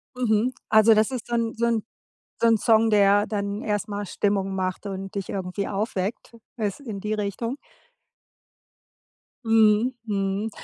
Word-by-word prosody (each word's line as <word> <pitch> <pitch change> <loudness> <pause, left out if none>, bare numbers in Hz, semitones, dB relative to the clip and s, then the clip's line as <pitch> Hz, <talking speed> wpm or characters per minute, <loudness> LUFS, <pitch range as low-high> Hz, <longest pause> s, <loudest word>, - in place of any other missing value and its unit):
Mhm. 240 0 +1 0.2
Also, 220 +1 +6
das 215 +3 +2
ist 240 -2 -6
dann 230 -1 0
so 235 +1 0
'n 230 -2 +1 0.6
so 235 - +5
'n 225 -1 +5
Song, 225 +1 +3
der 205 0 +4
dann 200 0 -3
erst 210 -3 -2
mal 205 0 -4
Stimmung 195 0 -1
macht 185 +1 -3
und 195 0 -6
dich 195 -2 -4
irgendwie 190 +1 -3
aufweckt, 205 +2 -3 0.2
es 210 +2 -2
in 220 -8 -6
die 210 +2 -3
Richtung? 215 +5 -3 1.9
Mhm, 225 +2 +4
mhm. 200 0 -1
210 Hz, 145 wpm, -24 LUFS, 200-225 Hz, 1.9 s, Also